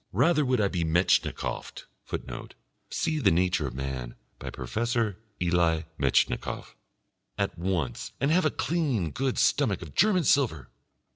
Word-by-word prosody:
Rather 150 - +3
would 130 -2 +1
I 100 - +3
be 90 -4 -1
Metchnikoffed 85 +3 0 0.2
[Footnote: 60 -2 -6 0.3
See 155 -1 -1
The 110 -9 +4
Nature 90 -3 +2
of 65 - -7
Man, 65 -2 -4 0.2
by - - -5
Professor 110 - -1 0.2
Elie 85 -2 +2
Metchnikoff.] 70 -3 0 0.6
at - - -1
once 85 -8 -2
and 140 +3 +2
have 180 +3 +4
a - - +5
clean, 135 - -1
good 135 - -1
stomach - - +2
of - - -11
German 205 -5 +4
silver. 115 - +2
95 Hz, 140 wpm, -28 LUFS, -, 0.6 s, a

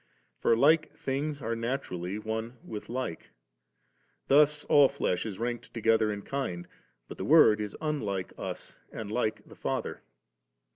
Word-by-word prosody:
For 115 - +3
like 155 +5 +4
things 140 +1 -3
are 115 +1 -1
naturally 115 -6 -3
one 110 +3 -4
with 105 -2 -7
like; 125 -9 -4 1.0
thus 150 +1 +5
all 140 -2 +6
flesh 115 -8 -1
is 100 -3 -6
ranked 120 0 -4
together 110 -1 +3
in 100 -1 -5
kind 90 -11 -3 0.2
'; - - -44
but - - -10
the - - -2
Word 105 0 +6
is 105 -1 -5
unlike 105 -12 -2
us - - -7
and 110 -2 -6
like 110 -2 -1
the - - -13
Father. - - -3
115 Hz, 150 wpm, -29 LUFS, 105-140 Hz, 1.0 s, all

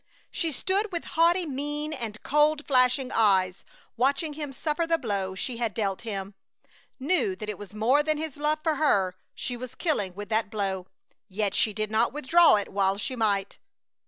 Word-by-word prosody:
She 330 -2 -1
stood 390 - -1
with 340 -2 -3
haughty 340 +2 +4
mien 295 +2 -3
and 225 -6 -6
cold, 300 +1 +2
flashing 255 -1 +3
eyes, 190 -4 +2 0.3
watching 280 +6 +1
him 295 -2 -5
suffer 305 +4 -2
the 330 0 +3
blow 200 -8 -2
she 235 +5 -4
had 230 -3 -2
dealt 195 -3 -1
him; 200 -3 -5 0.7
knew 370 - +1
that 215 - -7
it 210 - -5
was 205 0 -10
more 245 +7 +3
than 310 0 0
his 310 -2 -4
love 300 +1 +1
for 315 -3 +1
her 195 -12 +2 0.2
she 250 - -3
was 250 +1 -8
killing 205 - -1
with 205 +1 -7
that 220 -1 0
blow, 195 -3 -3 0.4
yet 200 0 -1 0.2
did 215 0 -2
not 225 +3 +2
withdraw 310 +3 +5
it 205 - -2
while 195 0 +1
she 255 +5 -4
might. 200 -4 0
250 Hz, 180 wpm, -27 LUFS, 205-300 Hz, 0.7 s, withdraw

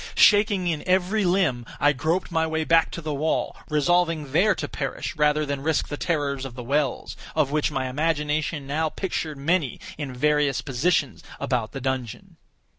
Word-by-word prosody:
Shaking 205 -3 +5
in 160 -4 0
every 190 +3 +2
limb, 175 -10 +2 0.2
I 145 +1 +4
groped 160 +7 -1
my 160 -1 +1
way 160 0 -1
back 165 +1 +4
to 170 - -5
the 155 -1 -3
wall—resolving 155 +1 0
there 190 +7 +4
to 145 - -4
perish 135 -2 -4
rather 150 0 +2
than 140 -1 -3
risk 155 0 0
the 145 - -3
terrors 145 -4 -1
of 130 -3 -7
the 125 - -6
wells, 140 +1 -1 0.2
of 150 -3 +2
which 150 0 +1
my 130 -3 -2
imagination 150 +1 -1
now 155 +3 0
pictured 160 -4 -3
many 150 0 0 0.2
in 145 -3 -4
various 150 +1 +2
positions 140 - 0 0.2
about 120 -4 -1
the 135 - -6
dungeon. 130 -4 -4
150 Hz, 170 wpm, -24 LUFS, 140-165 Hz, 0.2 s, Shaking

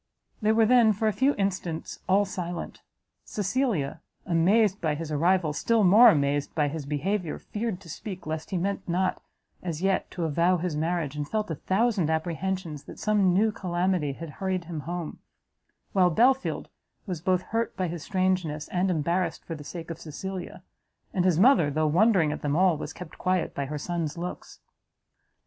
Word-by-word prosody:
They 215 0 +3
were 220 0 +4
then, 230 -2 +5
for 220 +2 -1
a 215 - +2
few 270 +6 +2
instants, 185 -5 -3
all 200 +2 +4
silent; 175 -3 -5 0.4
Cecilia, 200 - -1 0.2
amazed 195 +4 +3
by 155 -2 0
his 155 0 -5
arrival, 165 +1 +2
still 225 +7 +2
more 215 +6 +8
amazed 145 -4 +1
by 150 -2 +2
his 150 -1 -6
behaviour, 170 +4 -1
feared 215 -3 -4
to - - -14
speak 185 +3 -7
lest 155 0 -4
he 190 - -1
meant 195 +1 -2
not, 185 +2 0 0.4
as 170 -1 -4
yet, 195 -1 +1
to 175 - -4
avow 170 +4 +2
his 170 -2 -2
marriage, 160 -2 -1
and 145 -1 -4
felt 215 -4 -1
a - - -1
thousand 195 - +1
apprehensions 165 -1 -2
that - - -10
some 205 -3 +2
new 210 +5 +3
calamity 180 -6 -1
had 165 +2 -8
hurried 190 -2 -1
him 165 -2 -5
home: 175 -3 -4 0.7
while 185 -2 +5
Belfield 255 +9 +2 0.4
was 180 -6 -4
both 185 +1 +1
hurt 230 +1 -2
by 185 -1 0
his 170 -1 -5
strangeness, 185 -5 -1
and 185 +1 0
embarrassed 170 +2 -1
for 165 - -5
the 150 -2 -8
sake 165 +2 -7
of 165 - -7
Cecilia; 180 +4 -6 0.5
and 185 -3 +1
his 175 -3 +3
mother, 220 - +5
though 155 +2 0
wondering 175 0 +4
at - - -5
them 145 0 0
all, 180 0 +4
was 150 - -6
kept 180 -3 -10
quiet 185 -1 0
by 140 - -2
her 150 +2 -4
son's 165 0 -3
looks. 175 +1 -7
180 Hz, 180 wpm, -27 LUFS, 160-195 Hz, 0.7 s, more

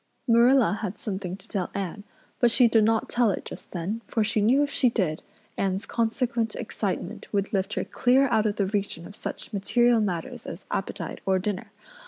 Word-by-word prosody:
Marilla 235 -2 +5
had 205 -2 -4
something 190 -4 -4
to 195 - -18
tell 190 -5 -2
Anne, 200 +1 -4 0.4
but 240 - +5
she 245 +1 +6
did 225 -1 +4
not 225 +1 +2
tell 240 -2 +2
it 195 - -2
just - - -9
then 190 +6 -3
for 225 - +1
she 210 0 +1
knew 255 +7 +4
if 285 - -2
she 255 - +3
did 180 -9 -1 0.4
Anne's 195 +1 0
consequent 230 0 -1
excitement - - -4
would 200 0 -1
lift 195 +1 0
her - - 0
clear 260 +2 +3
out 220 -2 +3
of 205 - -1
the 200 - +1
region 195 -4 -2
of 200 - -11
such - - -6
material 235 +4 +3
matters 180 -6 -3
as 170 - -7
appetite 190 -3 -4
or 190 -1 +2
dinner. 190 +1 -3
210 Hz, 195 wpm, -26 LUFS, 195-235 Hz, 0.4 s, she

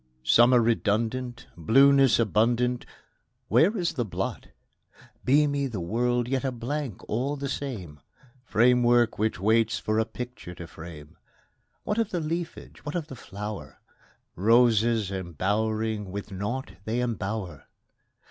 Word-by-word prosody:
Summer 120 - +6
redundant, 115 +2 0
Blueness 135 - +5
abundant, 120 +2 +1 0.6
Where 200 +8 +4
is 175 -3 0
the 125 - -1
blot? 105 - -4 0.8
Beamy 140 +1 +3
the 115 -7 -5
world, 120 +7 0
yet 135 +1 -1
a 135 - 0
blank 125 -1 -5
all 130 +6 -1
the 140 -1 -4
same, 110 - -5 0.4
Framework 120 -1 +3
which 110 -3 0
waits 110 +3 +2
for 110 +1 -1
a 110 - +2
picture 125 -9 -8
to 85 - -8
frame: 80 -2 -11 0.7
What 210 +2 -1
of 225 -2 +1
the 180 - -2
leafage, 165 +2 -5
what 150 - -5
of 165 -3 -3
the 135 - -7
flower? 105 -1 -7 0.6
Roses 115 0 +3
embowering 105 +4 -2
with 100 +1 -6
naught 105 +8 -4
they 110 +2 -1
embower! 105 - -3
115 Hz, 130 wpm, -26 LUFS, 105-130 Hz, 0.8 s, Summer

